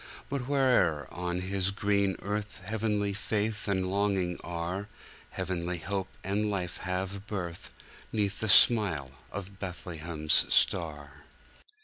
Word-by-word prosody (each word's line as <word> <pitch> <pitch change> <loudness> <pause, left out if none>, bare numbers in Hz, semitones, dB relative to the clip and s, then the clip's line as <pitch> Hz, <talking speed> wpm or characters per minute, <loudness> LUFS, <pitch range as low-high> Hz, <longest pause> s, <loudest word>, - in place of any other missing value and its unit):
"But 135 -3 -3
where'er 130 - +3
on 90 0 -3
His 95 0 0
green 100 -1 +1
earth 105 0 -3
Heavenly 105 -1 0
faith 105 +1 -2
and 95 -2 +1
longing 95 -3 0
are, 85 +4 -3 0.4
Heavenly 90 -1 -2
hope 95 +2 -3 0.2
and 105 +2 0
life 90 -4 -2
have 95 +2 -4
birth, 90 -6 -5 0.4
'Neath 105 -2 0
the 110 - -1
smile 95 - +6 0.2
of 100 0 -7
Bethlehem's 85 -4 0
star. 75 -4 +1
95 Hz, 115 wpm, -30 LUFS, 90-105 Hz, 0.4 s, smile